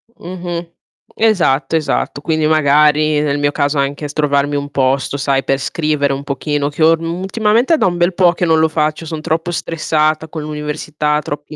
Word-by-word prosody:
Mh-mh. 175 -1 -6 0.4
Esatto, 175 -10 +2
esatto. 155 -2 -1
Quindi 155 0 0
magari 150 0 +3
nel 145 -1 0
mio 145 0 +1
caso 145 +1 0
anche 140 +2 -1
s 145 - -9
trovarmi 145 -1 +1
un 145 0 -3
posto 135 0 0
sai 135 -1 0
per 135 - 0
scrivere 150 -1 -1
un 135 +1 -5
pochino 145 +1 -2
che 150 +2 -2
orm 165 +2 +2
ultimamente 220 - +1
è - - +4
da - - +1
un 175 -1 0
bel 175 +2 +2
po' 175 -1 +3
che 175 - -1
non 160 -1 +3
lo 160 - +4
faccio, 155 0 -1
son 160 -1 -5
troppo 165 +2 -2
stressata 155 -1 -1
con 160 0 -6
l'università, 150 0 -2
troppi 150 +1 -7
155 Hz, 185 wpm, -16 LUFS, 145-165 Hz, 0.4 s, è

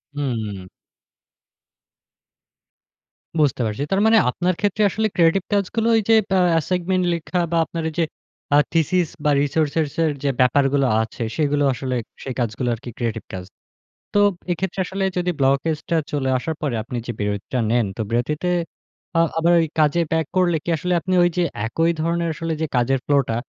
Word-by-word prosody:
হুম। 110 -9 -3 2.7
বুঝতে 145 -4 +2
পারছি। 110 +5 -2
তার 195 +1 +2
মানে 225 0 +6
আপনার 180 +8 0
ক্ষেত্রে 205 +1 0
আসলে 220 +3 0
ক্রিয়েটিভ 175 +2 +3
কাজগুলো 210 +3 0
এই 220 - +1
যে 225 - +7 0.2
বা 190 - +4 0.2
অ্যাসাইনমেন্ট 180 +2 0
লেখা, 170 +2 -2
বা 170 - +2
আপনার 165 -1 -5
এইযে 165 +1 -1 0.5
আ - - +7 0.2
থিসিস, 170 +2 +2 0.2
বা 150 - +4
রিসোর্সের 155 +1 0
যে 140 - +2
ব্যাপারগুলো 135 +2 +3
আছে, 110 +1 -6 0.2
সেগুলো 145 -1 +1
আসলে 130 +1 -3 0.3
সেই 130 - -4
কাজগুলা 120 +1 -1
আরকি 120 +2 -10
ক্রিয়েটিভ 115 -3 -3
কাজ। 90 -1 -5 0.7
তো 205 - +3 0.3
এক্ষেত্রে 185 +2 -3
আসলে 195 +2 -3
যদি 180 0 +1
ব্লকেজটা 145 +5 +1
চলে 140 -3 -1
আসার 160 +5 -3
পরে 140 -6 -1
আপনি 120 +2 -5
যে - - -1
বিরতিটা 105 +4 -2
নেন। 120 0 +2
তো - - -2
বিরতিতে 145 +9 -1 0.7
আ - - +5 0.2
আবার 170 +1 +3
ওই 165 - +1
কাজে 155 +2 +3
ব্যাক 160 -1 +1
করলে 175 -2 +3
কী - - -5
আসলে, 180 +4 -1
আপনি 185 - -2
ওই 175 - +4
যে 175 - +3 0.2
একই 165 +8 +1
ধরনের 170 +1 0
আসলে 165 0 -3
যে 160 - +2
কাজের 130 +2 +2
ফ্লোটা 140 -5 +2
155 Hz, 160 wpm, -21 LUFS, 130-175 Hz, 2.7 s, যে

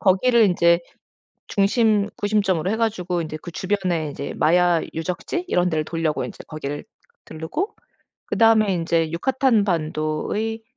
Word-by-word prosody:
거기를 225 +5 +4
인제 170 -3 +4 0.7
중심 210 0 +2
구심점으로 200 -5 +1
해가지고 205 -6 -1
인제 155 -1 -5
그 175 - -8
주변에 180 -4 -1
이제 140 - -6
마야 175 0 +3
유적지 180 - -3
이런 180 - +2
데를 155 -2 0
돌려고 165 -2 -1
인제 - - -9
거기를 145 -2 -5 0.4
들르고 160 - -4 0.5
그다음에 220 -3 +4
인제 165 -1 0
유카탄반도의 205 - 0
180 Hz, 310 characters per minute, -22 LUFS, 165-215 Hz, 0.7 s, 거기를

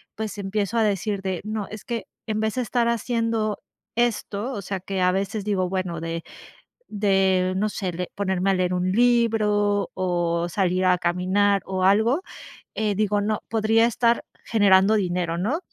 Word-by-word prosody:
pues 215 -2 -5
empiezo 200 +3 -2
a - - +4
decir 200 -1 -1
de: 190 -2 -3
"No, 215 -1 -4
es 215 -2 -9
que 230 -5 -4 0.2
en 215 -1 -2
vez 220 -1 -1
de 255 - 0
estar 235 +1 0
haciendo 230 -2 -1 0.4
esto", 235 -1 -1
o 200 - -5
sea 195 +1 -3
que 190 +1 -3
a 180 0 +4
veces 195 +2 -2
digo 190 -3 0
bueno 185 -3 -2
de, 165 0 -4 0.7
de, 190 -2 +2
no 210 +2 +1
sé 190 -4 -3
le, 180 +1 -5
ponerme 190 -1 0
a - - +3
leer 185 -1 0
un 180 +1 0
libro 210 -3 +2
o 175 -2 0
salir 185 0 0
a 180 -1 +4
caminar 185 +3 +1
o 190 -1 -2
algo, 220 - +3 0.5
eh, 215 -1 0
digo, 205 0 +1
no 210 +1 -1
podría 225 +1 +3
estar 235 0 +1 0.2
generando 200 -2 +4
dinero, 175 -4 -1
¿no? 250 - 0
200 Hz, 170 wpm, -24 LUFS, 185-220 Hz, 0.7 s, a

